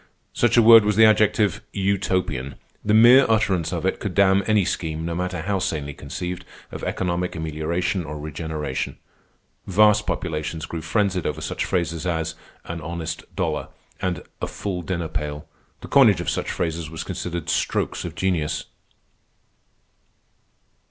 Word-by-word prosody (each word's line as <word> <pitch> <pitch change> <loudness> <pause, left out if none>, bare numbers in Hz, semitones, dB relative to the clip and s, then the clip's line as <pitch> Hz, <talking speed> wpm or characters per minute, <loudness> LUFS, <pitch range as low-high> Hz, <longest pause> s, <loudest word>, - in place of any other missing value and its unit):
Such 120 0 +2
a 120 - +7
word 115 0 +9
was 105 0 +1
the 110 +1 +7
adjective 105 -2 +3
Utopian. 95 -9 -1 0.3
The 105 +1 +2
mere 120 +5 +8
utterance 100 -6 +1
of - - -3
it - - 0
could - - -4
damn 100 0 +5
any 105 -3 +3
scheme, 80 -2 -3
no 85 - -2
matter 90 0 -2
how 100 +1 0
sanely 75 -5 -2
conceived, 90 +7 -5 0.3
of - - -7
economic 90 0 -2
amelioration 80 +4 -2
or 75 -1 -6
regeneration. 75 -2 -4 0.7
Vast 105 +2 +4
populations 80 -1 -3
grew 80 +1 -5
frenzied 90 +1 0
over 75 0 -3
such 75 - -3
phrases 85 -1 -1
as 80 -2 -1 0.3
"an 85 0 -5
honest 85 +1 -5
dollar" - - -1 0.3
and 90 -4 -2 0.2
"a - - -1
full 95 -3 -4
dinner 85 -2 -3
pail." 75 -1 -4 0.4
The - - -8
coinage - - +5
of - - -1
such - - -2
phrases 80 -1 -2
was 80 0 -5
considered 85 -2 -5
strokes - - -1
of 85 -2 -6
genius. 85 -5 -1
85 Hz, 150 wpm, -23 LUFS, 80-100 Hz, 0.7 s, word